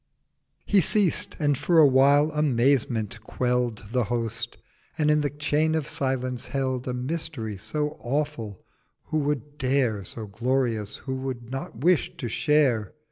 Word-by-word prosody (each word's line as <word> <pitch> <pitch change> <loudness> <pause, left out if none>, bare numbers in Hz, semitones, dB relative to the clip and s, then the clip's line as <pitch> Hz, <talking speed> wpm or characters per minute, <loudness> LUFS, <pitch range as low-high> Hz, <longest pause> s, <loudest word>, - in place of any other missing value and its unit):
He 200 -2 +4
ceased, 190 +1 0
and 145 -1 +2
for 170 +6 +1
awhile 145 +1 +6
Amazement 125 -7 +1
quell'd 120 -2 -1
The 125 -1 +1
Host, 115 +1 -3 0.4
and 150 -2 +3
in 150 0 +3
the 145 - 0
Chain 150 +2 +1
of 155 -3 0
Silence 130 -2 -2
held: 130 -2 -2
A 125 - -1
Mystery 125 -5 -3
so 150 +10 -3
awful 120 -7 -3 0.4
who 155 - +1
would 145 0 -2
dare— 130 -6 +1
So 110 +4 -6
glorious 115 -1 -1
who 130 - -2
would 130 -3 -5
not 135 -2 -6
wish—to 170 -7 +2
share? 130 -6 +2
130 Hz, 135 wpm, -26 LUFS, 115-150 Hz, 0.4 s, awhile